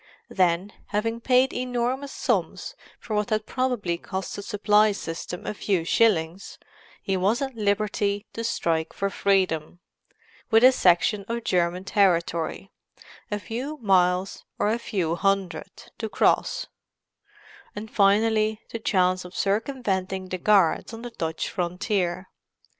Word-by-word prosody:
Then, 185 +2 +1
having 225 +2 -2
paid 255 +2 +3
enormous 250 +2 -2
sums - - -1 0.3
for 220 -3 -4
what 210 -1 0
had 215 0 0
probably 235 -10 -1
cost 190 +1 -5
the - - -5
supply 210 0 +3
system 170 -1 -6
a - - -2
few 190 -5 -1
shillings, 180 -3 +1 0.5
he 195 - 0
was 200 +6 +1
at 270 -2 -3
liberty 205 -1 0
to 230 - -4
strike 165 -8 -1
for 200 0 -2
freedom—with 190 +4 -1
a 255 - +9
section 195 -1 +3
of 235 0 -3
German 180 -1 0
territory—a 190 +1 -2
few 255 +9 -5
miles 185 -4 +1
or 205 - +1
a 230 - 0
few 185 -8 -1
hundred—to 195 +3 -2
cross; - - +1 1.1
and 215 +1 -7
finally 215 +1 +3
the 230 - -4
chance 185 -3 +1
of 180 0 -11
circumventing 195 -4 -1
the 185 - -3
guards 200 +2 +3
on 225 - -10
the 240 - -6
Dutch 160 -6 -3
frontier. 180 0 -2
200 Hz, 125 wpm, -25 LUFS, 180-225 Hz, 1.1 s, a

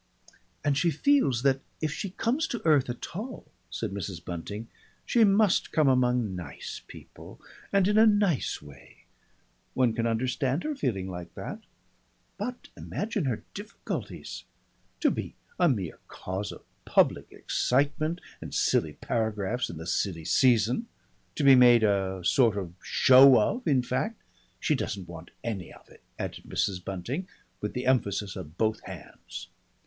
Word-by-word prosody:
"And 145 -1 +3
she 170 +5 +2
feels 150 - +2
that 135 -1 +3 0.2
if 155 -1 -1
she 200 - -4
comes 245 - 0
to 235 - -5
earth 150 -6 +4
at 120 +6 -6
all," 230 +6 -6 0.2
said - - -4
Mrs. 95 -3 -5
Bunting, 100 +6 -5 0.4
"she 235 - +4
must 205 -1 +3
come 155 -3 +3
among 125 -6 +2
nice 85 -6 -7
people - - -13 0.3
and 195 -2 +4
in 210 +1 +4
a 225 - +7
nice 205 - +1
way. 75 -2 -15 0.7
One 125 -3 +3
can 115 0 0
understand 130 +5 0
her 310 - -1
feeling 100 - -2
like 90 -2 -8
that. - - -6 0.8
But 245 +4 -5
imagine 210 -7 -3
her 125 -5 -2
difficulties! 205 +2 -6 0.6
To - - +4
be - - -5 0.2
a 175 -2 +5
mere 100 - -2
cause 95 +2 -5
of - - -11 0.2
public - - +2
excitement, 145 +6 0 0.2
and - - -7
silly - - +2
paragraphs 110 +1 -2
in 85 - -7
the 80 - -7
silly 90 -2 -1
season, 125 - +3 0.5
to 150 - -1
be 135 -1 +8
made 120 -2 +7
a 95 -3 +1
sort 115 -1 +4
of 90 -4 -4
show 130 0 +7
of, 245 - 0
in 130 -4 +3
fact 205 - -2 0.4
she - - +1
doesn't 95 -3 -3
want 85 -1 -10
any 100 -7 -4
of - - -16
it," - - -18 0.2
added - - -5
Mrs. 90 -3 -1
Bunting, 105 - -4 0.3
with 105 - -3
the 125 - -2
emphasis 105 -6 +1
of 90 -3 -9
both 110 -1 0
hands. - - -9
125 Hz, 155 wpm, -28 LUFS, 100-160 Hz, 0.8 s, be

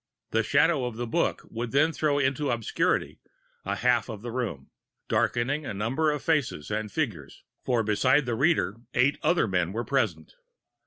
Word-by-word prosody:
The - - +2
shadow 160 -6 +2
of 120 -2 -4
the 120 +2 -3
book 115 - -1
would 115 +1 -4
then 145 +6 +3
throw 150 -2 0
into 140 +1 0
obscurity 115 -2 0 0.4
a - - -2
half - - +1
of 105 -1 -7
the 120 - -5
room, 110 - -4 0.4
darkening 135 +6 0
a 120 - -5
number 130 +10 0
of 150 -2 -2
faces 145 - 0
and 105 0 -2
figures; 100 - -4 0.2
for 120 -3 +1
besides 130 +7 +3
the 120 - -1
reader, 135 - +1 0.2
eight 130 +3 +3
other 175 -9 +2
men 90 -2 0
were 115 +2 -3
present. 105 - -1
120 Hz, 170 wpm, -27 LUFS, 110-145 Hz, 0.4 s, then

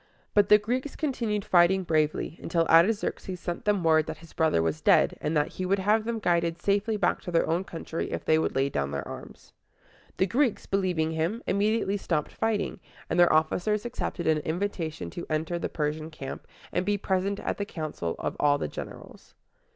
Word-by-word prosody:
But 205 -1 +4
the 210 - +9
Greeks 250 +7 -3
continued 230 -8 -2
fighting 185 +2 +4
bravely, 155 0 0
until 165 0 +1
Artaxerxes 185 +2 +2
sent 175 0 -5
them 205 -3 +2
word 155 -1 +4
that 160 -1 -5
his 165 0 -16
brother 160 - +2
was 80 -1 -1
dead, - - +4
and 155 +1 0
that 150 - +1
he 185 - -5
would 195 +2 +2
have 210 +3 +2
them 230 0 -1
guided 170 -4 +1
safely 205 +4 +1
back 185 -3 +1
to 175 - -6
their 165 - +2
own 170 +3 +1
country 165 -2 -5
if - - -4
they 155 0 +4
would - - -1
lay 135 +1 +2
down 70 - -2
their 70 -1 -4
arms. - - -10 0.6
The 190 - +3
Greeks, 240 +4 +1
believing 180 -5 0
him, 165 +9 -2
immediately 205 0 +1
stopped 155 -6 -2
fighting; 220 -3 -1 0.3
and 175 - +1
their 175 - +6
officers 180 +7 +1
accepted 195 -6 -4
an 155 -1 +3
invitation 160 - -3
to 170 - -7
enter 160 +2 -1
the - - -3
Persian 155 +1 -2
camp, 140 -4 -8 0.2
and 180 - 0
be 205 +2 +1
present 195 +1 -1
at - - -3
the 205 - -1
council 155 - -4
of - - -3
all 145 -1 +4
the - - -2
generals. - - -10
175 Hz, 195 wpm, -27 LUFS, 160-205 Hz, 0.6 s, the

